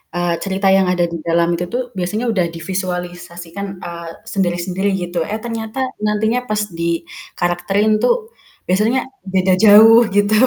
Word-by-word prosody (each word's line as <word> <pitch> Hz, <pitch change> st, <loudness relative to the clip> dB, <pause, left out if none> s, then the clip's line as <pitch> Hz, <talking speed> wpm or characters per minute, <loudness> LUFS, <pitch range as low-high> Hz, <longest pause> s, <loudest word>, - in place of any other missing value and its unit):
eee, 175 Hz, -1 st, 0 dB
cerita 195 Hz, 0 st, -1 dB
yang 190 Hz, -1 st, +2 dB
ada 175 Hz, -1 st, +2 dB
di -, -, -2 dB
dalam 170 Hz, 0 st, +2 dB
itu 175 Hz, +1 st, -3 dB, 0.3 s
biasanya 210 Hz, +6 st, -2 dB
udah 185 Hz, -4 st, +1 dB
divisualisasikan, 175 Hz, +1 st, -5 dB, 0.2 s
eee, 170 Hz, -1 st, -7 dB, 0.2 s
sendiri-sendiri 185 Hz, +1 st, -1 dB
gitu. 175 Hz, 0 st, -3 dB
Eh 215 Hz, -, -2 dB
ternyata 225 Hz, +1 st, -5 dB, 0.3 s
nantinya 220 Hz, +3 st, +1 dB
pas 215 Hz, 0 st, 0 dB, 0.2 s
dikarakterin 175 Hz, +4 st, -1 dB
tuh 250 Hz, -, +4 dB, 0.5 s
biasanya 215 Hz, +8 st, +2 dB, 0.3 s
beda 185 Hz, 0 st, +3 dB
jauh 220 Hz, +2 st, +8 dB
gitu 205 Hz, +1 st, +3 dB
185 Hz, 130 wpm, -18 LUFS, 175-210 Hz, 0.5 s, jauh